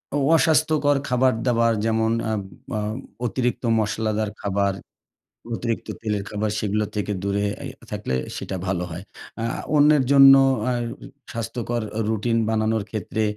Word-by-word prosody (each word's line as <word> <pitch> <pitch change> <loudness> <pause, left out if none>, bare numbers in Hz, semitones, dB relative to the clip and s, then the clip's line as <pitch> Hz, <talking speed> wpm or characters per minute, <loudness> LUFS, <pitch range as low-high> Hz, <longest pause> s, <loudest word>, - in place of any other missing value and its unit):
অ - - +2 0.2
অস্বাস্থ্যকর 155 -3 +3
খাবারদাবার 120 -2 +2
যেমন 110 0 +1 0.2
আ - - 0 0.5
আ - - -1 0.5
অতিরিক্ত 125 +2 -1 0.2
মশলাদার 110 0 -1
খাবার, 100 -1 0 0.8
অতিরিক্ত 115 0 -3
তেলের 105 -3 -1
খাবার 105 0 -1
সেগুলো 105 +1 0
থেকে 105 0 -2
দূরে 100 0 0 0.2
এ - - -4 0.2
থাকলে - - -3 0.2
সেটা 95 - -5
ভালো 90 -2 -1
হয়। 85 +3 -6 0.4
আ - - -2 0.3
অন্যের 150 -1 +5
জন্য 135 -1 +9 0.3
অ্যা 125 +1 0 0.6
স্বাস্থ্যকর 120 +1 -3 0.3
রুটিন 115 +1 0
বানানোর 110 -1 +1
ক্ষেত্রে 110 0 -2
110 Hz, 125 wpm, -23 LUFS, 105-125 Hz, 0.8 s, জন্য